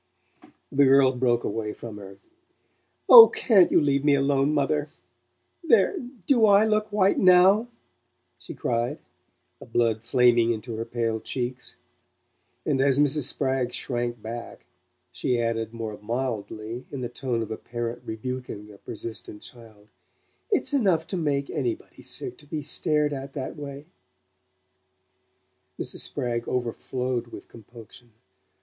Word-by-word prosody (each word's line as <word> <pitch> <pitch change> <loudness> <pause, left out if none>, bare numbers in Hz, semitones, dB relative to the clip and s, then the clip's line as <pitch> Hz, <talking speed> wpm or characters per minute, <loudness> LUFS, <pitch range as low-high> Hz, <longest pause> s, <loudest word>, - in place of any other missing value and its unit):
The 140 +1 +4
girl 135 0 +5
broke 125 -2 0
away 105 0 -3
from 110 -3 -9
her. 100 -1 -11 0.9
"Oh, 460 -2 +12
can't 200 -8 +4
you - - +5
leave 140 -2 +1
me 145 -1 +4
alone, 140 +1 +1
mother? 150 0 0 0.7
There 405 +4 +3 0.3
do 235 -3 +4
I 200 +1 +5
look 215 0 0
white 200 -1 +2
NOW?" 190 +5 +5 0.7
she - - -9
cried, 120 0 -2 0.6
the - - -12
blood 115 -2 0
flaming 120 -1 +3
into 115 +1 -5
her 115 - -4
pale 115 -1 -2
cheeks; 125 +2 -5 0.9
and 135 -3 +1
as 135 -1 +3
Mrs. 145 -1 +2
Spragg 130 -2 -1
shrank 120 -2 -3
back, 115 +2 -8 0.5
she 125 -1 -1
added 115 -1 -2
more 110 -2 -6
mildly, 115 0 -4
in 140 - -5
the 120 - -2
tone 120 -1 -3
of 110 - -8
a 110 - -4
parent 120 0 -5
rebuking 110 -2 -6
a 100 - -17
persistent 110 -1 -7
child: 110 -3 -15 0.6
"It's 400 -8 +1
enough 190 - +2
to - - -3
MAKE 140 -4 -1
anybody 360 +2 -4
sick 380 - -4
to 145 - -15
be 150 0 -4
stared 150 0 +1
at 135 0 -7
that 135 0 -5
way!" 145 -1 -8 1.9
Mrs. - - -3
Spragg 120 -1 -3
overflowed 125 0 -3
with - - -11
compunction. 115 +1 -15
125 Hz, 135 wpm, -25 LUFS, 115-145 Hz, 1.9 s, Oh